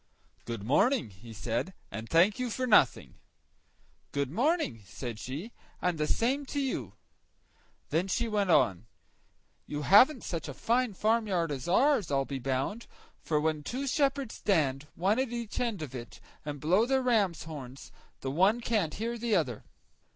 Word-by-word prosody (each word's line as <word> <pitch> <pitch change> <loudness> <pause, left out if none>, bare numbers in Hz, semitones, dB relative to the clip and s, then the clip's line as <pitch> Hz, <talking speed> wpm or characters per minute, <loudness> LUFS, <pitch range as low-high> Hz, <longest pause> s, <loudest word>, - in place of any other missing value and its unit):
"Good 115 -4 -5
morning," 145 - +2
he 100 +5 -13
said, 115 - -3 0.2
"and 110 +1 -6
thank 185 +8 +4
you 250 -1 -1
for 255 +3 -2
nothing." 210 - +3 0.9
"Good 140 -2 -1
morning," 245 - 0
said 115 +1 -6
she, 150 - -6 0.3
"and 180 -3 -1
the 150 - +1
same 260 - +1
to 285 - -2
you." 270 -2 -2 1.0
Then 170 +4 +1
she 235 +5 0
went 205 -3 0
on— 100 - +3 0.8
"You 145 0 -4
haven't 250 - +6
such 165 -3 -4
a 140 - -7
fine 235 -2 +1
farmyard 210 -7 +1
as 135 -3 -4
ours, 245 - +3
I'll 135 -1 +1
be 135 -1 -4
bound; 135 - -2 0.3
for 155 -2 0
when 155 0 0
two 255 - -4
shepherds 275 -3 0
stand, 150 -7 0
one 195 +7 +1
at 260 -2 0
each 235 -3 -4
end 230 -9 -1
of 135 -4 -8
it, 120 -2 -8 0.2
and 145 -1 -5
blow 185 - +3
their 265 0 +2
ram's 210 -9 +2
horns, 140 -4 -9 0.3
the 135 - -3
one 190 - +3
can't 215 -10 0
hear 230 +3 -3
the 230 -2 +1
other." 130 - -1
180 Hz, 165 wpm, -30 LUFS, -, 1.0 s, haven't